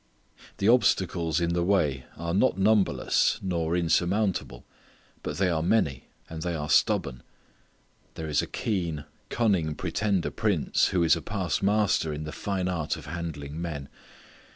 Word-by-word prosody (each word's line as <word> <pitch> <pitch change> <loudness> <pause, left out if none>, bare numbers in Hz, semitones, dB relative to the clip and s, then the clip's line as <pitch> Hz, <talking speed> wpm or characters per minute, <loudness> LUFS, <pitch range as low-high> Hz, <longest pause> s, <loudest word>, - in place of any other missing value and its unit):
The 100 - 0
obstacles 90 -9 +2
in 85 0 0
the 85 - +1
way 75 -9 +1
are 85 0 -3
not 100 +5 +2
numberless 100 0 +2
nor 85 -2 0
insurmountable, 90 - 0 0.6
but 75 - -5
they 95 +1 +2
are 80 -3 0
many 80 - +1 0.2
and 80 -1 -7
they 85 0 -2
are 75 -1 -3
stubborn. 60 -3 +2 0.9
There 80 - -5
is 75 -2 +2
a - - -5
keen, 85 -9 -2 0.2
cunning 95 -10 +1
pretender 95 +2 -1
prince - - +1
who 90 -2 +1
is 80 0 +5
a 85 - -5
past 95 -3 -2
master 100 -5 +2
in 75 +1 -4
the 75 - -6
fine 95 0 -2
art 85 -4 -1
of - - -10
handling 80 -3 -5
men. 75 -5 -5
85 Hz, 150 wpm, -27 LUFS, 80-95 Hz, 0.9 s, is